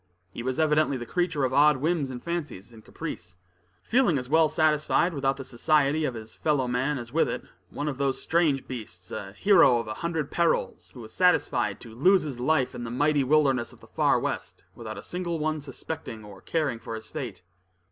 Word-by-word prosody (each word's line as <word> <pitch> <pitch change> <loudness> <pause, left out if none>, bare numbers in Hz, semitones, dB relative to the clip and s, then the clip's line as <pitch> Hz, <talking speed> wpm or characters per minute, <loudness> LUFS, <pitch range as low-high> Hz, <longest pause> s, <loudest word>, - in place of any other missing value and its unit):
He - - -6
was 130 +3 -2
evidently 155 -3 +2
the 120 - -6
creature 165 0 -1
of 130 0 0
odd 150 0 +5
whims 155 0 0
and 125 -2 -7
fancies 150 - -5
and 110 -1 -14
caprice, 90 0 -8 0.5
feeling 240 - +3
as 125 -1 -4
well 160 +2 +4
satisfied 155 +3 +2
without 135 -2 0
the 135 - -7
society 150 +4 +2
of 130 - -2
his 110 -1 -9
fellow 145 -5 0
man 130 +4 0
as 120 0 -8
with 165 - +2
it - - -4 0.3
one 145 - -4
of 140 -2 -3
those 135 -1 0
strange 160 -5 +1
beings, 105 -8 -8
a 95 -1 -6
hero 165 - +5
of 115 -2 -3
a 105 - -3
hundred 165 -4 -2
perils, 170 -1 0
who 125 - -9
was 110 -1 -10
satisfied 180 -9 +2
to 115 -2 -11
lose 180 - +4
his 140 -5 -6
life 130 0 +1
in 120 - -6
the 115 - -5
mighty 145 +3 +2
wilderness 135 -3 +2
of - - -18
the - - -16
Far - - +2
West, - - -4
without - - -8
a - - -8
single 175 -2 -3
one 155 0 -1
suspecting 135 -5 -7
or 100 -2 -12
caring 150 -8 -1
for 115 - -6
his 110 0 -9
fate. 120 - -6
140 Hz, 210 wpm, -27 LUFS, 120-155 Hz, 0.5 s, odd